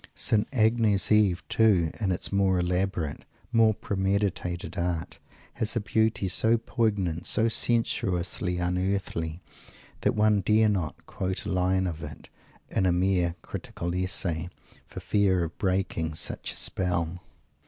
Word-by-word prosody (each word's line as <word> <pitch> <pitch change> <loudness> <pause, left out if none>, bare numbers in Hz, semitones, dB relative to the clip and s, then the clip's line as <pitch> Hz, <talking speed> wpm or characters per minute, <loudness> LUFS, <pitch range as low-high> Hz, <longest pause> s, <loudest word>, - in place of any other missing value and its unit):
St. 105 -1 +1
Agnes 110 -5 +3
Eve 100 -3 +3
too, 95 -8 +3
in 100 -4 0
its 90 - -1
more 100 -2 +2
elaborate, 90 -3 -1 0.3
more 110 -2 +4
premeditated 95 -3 -2
art, 85 -2 -3 0.3
has 110 +2 0
a - - +2
beauty 110 -1 0
so 110 +6 +2
poignant, 100 -8 -1
so 115 - +2
sensuously 90 -6 0
unearthly, 90 -2 -2 0.6
that - - +1
one 105 -1 +3
dare 110 +2 +3
not 90 -7 -3
quote 95 0 -4
a - - -3
line 95 0 +1
of 80 -3 -4
it, 75 -1 -9 0.4
in 95 - +1
a - - +3
mere 90 -1 +1
"critical 85 0 -5
essay," 90 -2 -1 0.4
for - - -8
fear 95 -4 +2
of 85 0 -6
breaking 90 -4 -1
such 85 - -3
a - - -10
spell! 90 -2 -1
95 Hz, 135 wpm, -27 LUFS, 90-105 Hz, 0.6 s, more